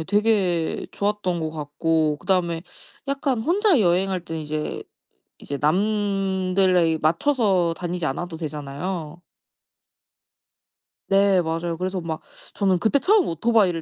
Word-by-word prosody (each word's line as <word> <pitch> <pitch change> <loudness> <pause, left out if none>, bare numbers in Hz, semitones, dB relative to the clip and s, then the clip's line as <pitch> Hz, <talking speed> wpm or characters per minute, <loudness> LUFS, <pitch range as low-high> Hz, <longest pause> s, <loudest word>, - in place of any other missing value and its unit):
예. 160 - -4
되게 195 -5 +1
좋았던 200 -4 -1
것 160 - -2
같고 155 0 0
그다음에 170 -3 0 0.5
약간 275 -4 0
혼자 360 - +3
여행할 185 +1 +2
때는 160 -1 -5
이제 150 0 -4 0.6
이제 140 - -5
남들에 190 -2 +2
맞춰서 180 - +2
다니지 175 -1 -3
않아도 165 +4 -3
되잖아요. 155 +2 -5 1.9
네. 195 -2 +4
맞아요. 165 +1 -2
그래서 185 +1 -2
막 160 -2 -4 0.3
저는 190 -3 +2
그때 225 +9 +2
처음 405 +1 +3
오토바이를 180 -1 +2
180 Hz, 265 characters per minute, -23 LUFS, 165-205 Hz, 1.9 s, 네